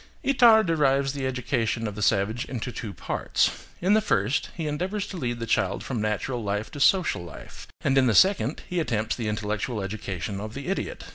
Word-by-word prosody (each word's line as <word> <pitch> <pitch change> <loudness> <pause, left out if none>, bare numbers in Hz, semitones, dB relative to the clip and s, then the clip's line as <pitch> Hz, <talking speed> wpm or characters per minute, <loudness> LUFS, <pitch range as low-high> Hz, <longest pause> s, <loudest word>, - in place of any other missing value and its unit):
Itard 235 -5 +6
divides 140 -4 +2
the 135 -2 -2
education 120 -3 -1
of 105 - -4
the 105 - -7
savage 105 +3 +1
into 125 -1 -4
two 115 -3 -6
parts. 95 - -1
In 185 +4 +3
the 215 - +5
first, 110 - 0
he 165 - -4
endeavours 185 +7 -2
to 200 - -8
lead 120 -6 -2
the 115 - -3
child 100 -3 0
from 120 -5 -3
natural 110 +4 -2
life 105 +2 -2
to 145 - -8
social 150 - +3
life; 85 - -11
and 135 - +1
in 135 -1 +4
the 110 - +2
second, 185 - +3
he 180 - -1
attempts 115 -8 -1
the 115 -3 -3
intellectual 105 +2 -2
education 100 -1 -4
of 110 +1 -7
the 140 +4 -5
idiot. 455 - -3
125 Hz, 200 wpm, -26 LUFS, 105-155 Hz, -, Itard